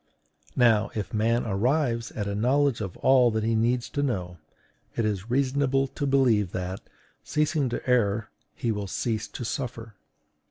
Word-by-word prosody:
Now, 115 Hz, -4 st, +4 dB
if 105 Hz, -2 st, -4 dB
man 115 Hz, +2 st, +1 dB
arrives 115 Hz, +3 st, 0 dB
at 105 Hz, -, -3 dB
a 100 Hz, -, -2 dB
knowledge 130 Hz, +4 st, +2 dB
of 95 Hz, -4 st, -5 dB
all 130 Hz, -2 st, +5 dB
that 110 Hz, -1 st, -1 dB
he 115 Hz, +1 st, +1 dB
needs 120 Hz, +2 st, +1 dB
to 145 Hz, -, -2 dB
know, 90 Hz, -, -2 dB, 0.6 s
it 115 Hz, -, 0 dB
is 105 Hz, 0 st, -2 dB
reasonable 135 Hz, +1 st, +2 dB
to 140 Hz, -, -3 dB
believe 120 Hz, -9 st, +3 dB
that, 90 Hz, +1 st, -3 dB, 0.4 s
ceasing 150 Hz, -3 st, 0 dB
to 120 Hz, -, -5 dB
err, 110 Hz, -4 st, +1 dB, 0.2 s
he 115 Hz, -, -1 dB
will 105 Hz, -2 st, -3 dB
cease 110 Hz, +2 st, -2 dB
to 120 Hz, -, -7 dB
suffer. 115 Hz, -3 st, -4 dB
115 Hz, 160 wpm, -26 LUFS, 105-130 Hz, 0.6 s, all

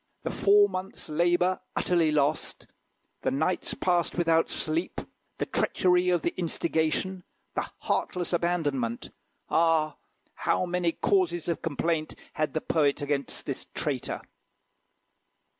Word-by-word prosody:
The -, -, -2 dB
four 205 Hz, 0 st, +5 dB
months' 185 Hz, -2 st, -6 dB
labour 175 Hz, +3 st, +2 dB, 0.2 s
utterly 170 Hz, -3 st, +2 dB
lost; 150 Hz, 0 st, 0 dB, 0.6 s
the -, -, +1 dB
nights 180 Hz, +7 st, -1 dB
passed 175 Hz, -2 st, +1 dB
without 165 Hz, -1 st, +3 dB
sleep; 160 Hz, +3 st, -2 dB, 0.4 s
the -, -, -1 dB
treachery 180 Hz, -1 st, +2 dB
of 175 Hz, -3 st, +2 dB
the 170 Hz, -, 0 dB
instigation; 170 Hz, +2 st, 0 dB, 0.3 s
the -, -, -2 dB
heartless 180 Hz, -1 st, -1 dB
abandonment! 145 Hz, -9 st, 0 dB, 0.4 s
Ah! 160 Hz, -2 st, +3 dB, 0.4 s
how -, -, 0 dB
many 175 Hz, -1 st, 0 dB
causes 175 Hz, -4 st, +1 dB
of 170 Hz, -, -1 dB
complaint 165 Hz, 0 st, -1 dB, 0.2 s
had 155 Hz, 0 st, -1 dB
the 155 Hz, -, +1 dB
poet 145 Hz, -2 st, +1 dB
against 140 Hz, -2 st, -2 dB
this -, -, -5 dB
traitor! -, -, -2 dB
170 Hz, 120 wpm, -28 LUFS, 155-180 Hz, 0.6 s, four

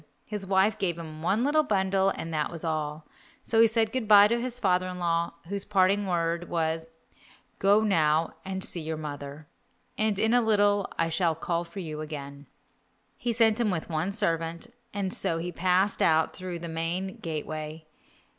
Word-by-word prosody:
His 205 Hz, -2 st, -5 dB
wife 195 Hz, +3 st, +2 dB
gave 175 Hz, -5 st, 0 dB
him 155 Hz, -2 st, -8 dB
one 200 Hz, +8 st, +1 dB
little 295 Hz, +3 st, +3 dB
bundle 195 Hz, -6 st, +1 dB
and 165 Hz, -3 st, -5 dB
that 150 Hz, -1 st, 0 dB
was 165 Hz, -2 st, -8 dB
all, 155 Hz, -1 st, -3 dB, 0.4 s
so 225 Hz, -1 st, +3 dB
he 230 Hz, -, +7 dB
said 220 Hz, 0 st, +1 dB
good 255 Hz, -3 st, -2 dB
bye 205 Hz, -1 st, +8 dB
to 235 Hz, +1 st, +1 dB
his 250 Hz, 0 st, -2 dB
father 185 Hz, -4 st, +2 dB
in 180 Hz, 0 st, -6 dB
law, 170 Hz, -1 st, 0 dB
whose 200 Hz, +1 st, -3 dB
parting 200 Hz, 0 st, +2 dB
word 170 Hz, -1 st, -1 dB
was, 160 Hz, -1 st, -1 dB, 0.7 s
"Go 205 Hz, +2 st, +4 dB
now 160 Hz, -5 st, +2 dB
and 190 Hz, 0 st, -4 dB
see 170 Hz, -, -3 dB
your 160 Hz, 0 st, -4 dB
mother, 145 Hz, 0 st, -7 dB, 0.5 s
and 215 Hz, -2 st, +1 dB
in 220 Hz, +3 st, +2 dB
a 245 Hz, -, +5 dB
little 205 Hz, -3 st, +2 dB
I 165 Hz, 0 st, +1 dB
shall 165 Hz, -1 st, +1 dB
call 170 Hz, +1 st, -2 dB
for 180 Hz, +3 st, -8 dB
you 155 Hz, -3 st, -5 dB
again." 140 Hz, -2 st, -8 dB, 0.7 s
He 240 Hz, -, -2 dB
sent 225 Hz, -1 st, +3 dB
with 185 Hz, -7 st, -1 dB
him -, -, -6 dB
one 160 Hz, +5 st, 0 dB
servant, 165 Hz, -3 st, -2 dB, 0.3 s
and 195 Hz, -2 st, -2 dB
so 165 Hz, -, +2 dB
he 175 Hz, +2 st, -4 dB
passed 185 Hz, +3 st, +1 dB
out 160 Hz, 0 st, +3 dB
through 185 Hz, -2 st, -5 dB
the 170 Hz, 0 st, -7 dB
main 170 Hz, +4 st, -3 dB
gateway. 155 Hz, 0 st, -5 dB
180 Hz, 185 wpm, -27 LUFS, 160-205 Hz, 0.7 s, bye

